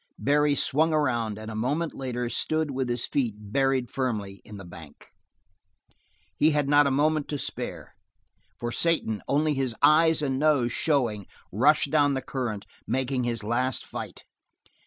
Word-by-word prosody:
Barry 145 +1 +2
swung 155 +4 +2
around 120 -8 0
and 110 +1 -7
a - - -6
moment 145 +9 -1
later 125 -2 -3
stood 155 +4 -1
with 130 -1 -2
his 120 0 -1
feet 120 -7 -1
buried 130 +4 0
firmly 105 -7 -3
in 105 - -10
the 95 - -10
bank. 85 -4 -13 1.3
He 155 - +4
had 150 -2 +1
not 145 0 +5
a - - +2
moment 150 +2 +1
to 145 - -3
spare, - - -5 0.7
for 120 0 -3
Satan, 115 -9 0
only 150 +2 +2
his 135 -4 -1
eyes 160 0 +5
and 135 -2 0
his 130 - -2
nose 145 -6 +2
showing, 120 - 0 0.2
rushed 140 - +3
down 145 -2 +3
the 130 - -3
current, 110 -6 -4 0.2
making 130 -1 -1
his 115 -2 -2
last 125 +4 -1
fight. - - -8
130 Hz, 160 wpm, -26 LUFS, 115-145 Hz, 1.3 s, not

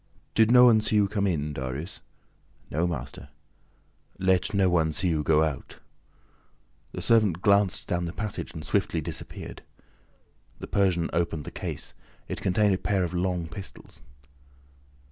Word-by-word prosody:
"Did 110 -1 +4
no 125 +1 +8
one 110 -3 +6
see 105 0 +1
you 105 -1 +4
come 100 0 0
in, 75 -4 -1
Darius?" 65 +5 -5 0.7
"No, 80 +4 +1
master." 70 -4 -6 0.9
"Let 95 0 +2
no 100 -2 +3
one 80 -3 +2
see 95 +2 +1
you 80 -2 +1
go 75 +1 +3
out." 75 -5 -4 1.1
The - - -6
servant 105 -7 +3
glanced 100 -2 +3
down 90 0 -1
the 85 - -4
passage 105 +2 -5
and 75 - -7
swiftly 80 - 0
disappeared. 80 0 -7 1.0
The - - -7
Persian 90 -4 +1
opened 85 -3 -1
the - - -8
case. - - -5 0.3
It - - -5
contained 100 +2 +2
a 95 - -1
pair 100 -2 0
of 90 - -3
long 90 -1 -1
pistols. 95 +4 -9
90 Hz, 150 wpm, -27 LUFS, 80-100 Hz, 1.1 s, no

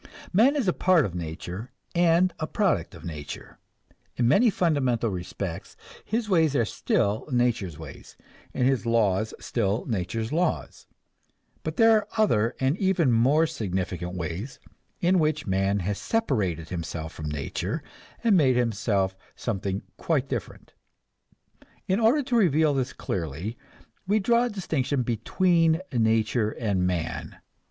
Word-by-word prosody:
Man 240 +10 +5
is 270 -8 0
a 180 - +3
part 180 -6 +3
of 95 - -4
nature 90 +6 -6 0.2
and 175 +1 +3
a 155 - -2
product 180 - 0
of - - -11
nature; 75 -4 -8 0.6
in 120 - +2
many 205 - +5
fundamental 130 - +1
respects 90 -2 -6 0.3
his 225 +1 -2
ways 160 -7 +3
are 120 - +3
still 105 +2 0
nature's 120 - 0
ways 80 -3 -11 0.3
and 125 - +1
his 130 -3 +1
laws 110 -2 +2
still 110 -1 -1
nature's 110 +1 -2
laws. 170 0 -1 0.7
But 155 0 -5
there 225 0 +6
are 215 -2 +3
other 120 - +2
and 135 +3 +2
even 185 -8 +2
more 135 +8 +4
significant 90 - -3
ways 90 - -5 0.4
in 180 +1 +3
which 155 -1 0
man 95 +1 +1
has 100 +3 -2
separated 100 - -1
himself 80 -2 -5
from 75 -1 -5
nature 70 -3 -3 0.4
and 225 -4 +4
made 135 -7 +4
himself 105 -5 0 0.2
something 100 -3 -3
quite 145 -5 0
different. 125 -7 -6 1.1
In 190 +3 +2
order 240 +6 +4
to 255 -2 -1
reveal 160 -8 +4
this 130 -2 -1
clearly, 85 - -4 0.5
we 205 +2 +3
draw 235 +4 +3
a - - -1
distinction 150 - -1
between 165 - +2
nature 110 -1 +2
and 100 -5 -1
man. 85 -3 -3
120 Hz, 140 wpm, -26 LUFS, -, 1.1 s, there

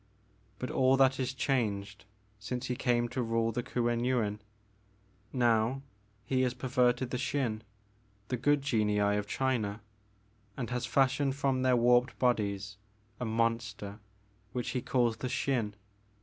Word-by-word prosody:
But 125 - -4
all 130 0 +4
that 135 0 +4
is 130 -1 0
changed 105 -7 -1 0.3
since 125 +5 -4
he 125 - -2
came 120 -2 +1
to 130 - -2
rule 115 -1 +1
the 120 - -2
Kuen 120 -1 -1
Yuin. 115 -5 0 0.9
Now 120 +1 +2 0.4
he 130 +2 +1
has 125 -1 +1
perverted 125 0 +1
the 125 - -1
Xin, 125 -5 -1 0.3
— 105 -1 -36
^the 125 -2 -2
good 145 0 +3
genii 110 -6 +1
of 105 0 +1
China, 115 -6 -1 0.4
— 105 0 -36
and 125 -2 -4
has 125 -1 -2
fashioned 135 0 +2
bom 135 -2 +1
their 130 -1 +4
warped 120 +1 +3
bodies 100 -5 0 0.4
a 125 - -2
monster 115 -2 -1 0.5
which 125 -2 -2
he 125 - -2
calLs 120 -3 +1
the 130 - -2
Xin. 120 -5 -1
120 Hz, 150 wpm, -31 LUFS, 110-130 Hz, 0.9 s, all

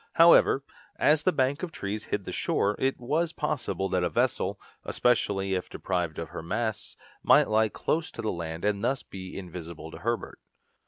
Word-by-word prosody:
However, 165 -4 +6 0.3
as 150 0 +4
the 185 - +3
bank 135 -2 +1
of 180 -3 -4
trees 105 -5 -4
hid - - -2
the - - -5
shore, 105 +1 0
it 135 0 0
was 155 +7 0
possible 140 -10 -2
that 90 -1 +1
a 90 - +1
vessel, 75 - 0 0.2
especially 100 -5 +1
if 90 -1 -2
deprived 90 -4 -2
of 80 - -5
her 85 - -6
masts, 110 +6 -3 0.2
might - - +5
lie 110 0 +3
close 160 +9 -1
to 115 - -6
the 110 - 0
land 85 0 -5
and 105 -1 +1
thus 135 +4 0
be 95 -1 -8
invisible 85 -3 -8
to - - -9
Herbert. 115 +1 -3
105 Hz, 180 wpm, -28 LUFS, 90-135 Hz, 0.3 s, However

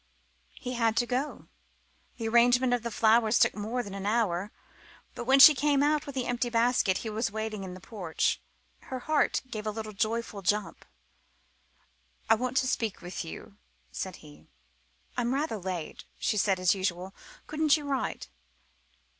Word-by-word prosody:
He 250 -1 -5
had 230 -2 +1
to 240 - +3
go. 260 +4 -3 0.7
The 225 -2 -3
arrangement 245 +2 +4
of 245 - +1
the 235 - -4
flowers 225 0 +3
took - - +4
more 225 +4 -3
than 200 -3 -8
an 195 0 -4
hour, 205 -3 0 0.6
but 240 - -6
when 265 +2 +5
she 300 +3 +11
came 285 0 +2
out 300 0 +1
with 280 - -7
the 255 -2 -1
empty 245 0 -1
basket, 230 -5 +2
he - - -2
was 220 +1 -1
waiting 215 -1 -4
in 185 -1 -7
the - - -10
porch. 180 -4 -2 0.4
Her 255 -1 -5
heart 310 +1 +1
gave 215 -1 -5
a - - +1
little 215 0 -6
joyful 220 0 -2
jump. 205 +3 -1 1.5
"I - - +10
want 250 +3 -1
to 260 - +2
speak 225 -5 -1
to 175 +1 -6
you," 80 - -10 0.3
said 65 - -5
he. 75 +1 -16 0.7
"I'm 245 +1 0
rather 280 -5 -1
late," 180 -4 -5
she - - 0
said, 195 -2 +2
as 185 -1 +4
usual; 185 -1 -3 0.3
"couldn't 310 0 +2
you 295 - -7
write?" 275 -2 -2
225 Hz, 170 wpm, -29 LUFS, 200-250 Hz, 1.5 s, she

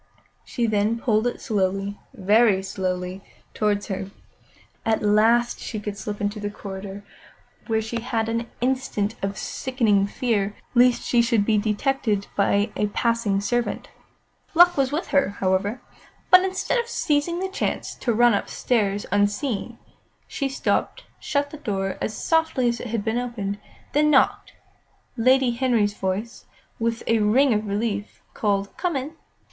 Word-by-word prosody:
Then 220 -2 +2
she 230 - -8
pulled 220 -1 +2
it 245 - -3
slowly, 195 -1 -1 0.2
very 205 -1 +3
slowly, 185 -1 -3 0.3
towards 205 -1 0
her. 195 -2 -4 0.7
At 220 -1 0
last 225 +3 +3
she 215 - -5
could 210 -1 -5
slip 205 0 -5
into 205 +1 -2
the 205 0 -3
corridor, 200 0 -8 0.6
where 220 -1 +1
she 230 +1 -4
had 225 -2 -1
an 230 +1 -2
instant 250 -5 0
of 195 0 -3
sickening 220 -7 +1
fear 205 -2 -1 0.2
lest 245 0 +4
she 240 - +3
should 230 -3 +2
be 215 -1 +3
detected 215 -1 0
by 205 +1 +2
a 210 - +1
passing 225 -2 0
servant. 240 +3 -2 0.7
Luck 350 +1 +7
was 270 -1 +1
with 310 +4 -2
her, 275 -9 +2
however; 195 +5 0 0.5
but 365 0 +9
instead 380 +5 0
of 475 - -2
seizing 325 -6 0
the 380 - -1
chance 380 - -3
to 245 - -2
run 240 +1 +5
upstairs 205 -1 0
unseen, 205 +3 0 0.5
she 275 -2 -2
stopped, 385 - -1 0.2
shut 285 0 -1
the 305 - -8
door 195 -8 -3
as 220 - -2
softly 320 -6 +1
as 235 0 0
it - - -6
had 225 -2 -3
been 225 +2 0
opened, 205 -5 -4
and - - -27
then 300 +1 +4
knocked. 270 -3 +2 0.6
Lady 255 +1 +4
Henry's 235 -4 +1
voice, 200 +4 -4 0.3
with 230 0 -1
a 230 -1 +2
ring 240 +5 +4
of 210 0 -1
relief, 205 0 -3
called 200 -2 -1
"Come 355 -4 -1
in!" 275 +4 -3
225 Hz, 150 wpm, -24 LUFS, 205-250 Hz, 0.7 s, but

